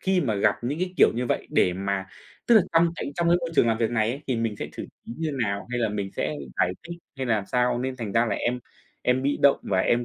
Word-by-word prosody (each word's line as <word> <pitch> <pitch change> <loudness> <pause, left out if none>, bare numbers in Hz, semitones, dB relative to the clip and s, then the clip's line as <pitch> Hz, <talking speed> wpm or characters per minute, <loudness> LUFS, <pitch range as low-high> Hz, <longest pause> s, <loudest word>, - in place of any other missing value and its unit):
khi 190 -1 +2
mà 115 -9 0
gặp 100 +1 +2
những 145 +6 -2
cái 185 0 -2
kiểu - - +7
như 125 +2 -1
vậy - - -1
để 90 - +3
mà 95 +1 -2 0.4
tức 240 - +6
là 215 - +7
trong 165 +1 +5
cái 140 - -4
trong 170 -1 +1
cái 175 - +5
môi 170 - -3
trường 120 - +4
làm 110 0 +1
việc 115 -1 +1
này 110 -2 +1
ấy 140 +4 -6
thì 130 - 0
mình 115 -2 -1
sẽ - - -4
xử - - -6 0.2
trí - - -6
như 160 -2 -1
nào 100 -1 -3
hay 125 - -1
là 115 - +1
mình 100 -2 -3
sẽ 75 - -1 0.2
giải 90 - +2 0.2
thích, 170 - -6 0.2
hay 135 -1 -3
làm 110 -4 0
sao 125 -1 +1
nên 130 +1 -3
thành 110 -5 -5
ra 115 +1 +3
là 110 - 0
em 125 +1 -1 0.4
em 125 +1 +2
bị 140 +1 0
động 140 -1 +6
và 95 - 0
em, 120 +4 +2
120 Hz, 285 wpm, -25 LUFS, 105-140 Hz, 0.4 s, kiểu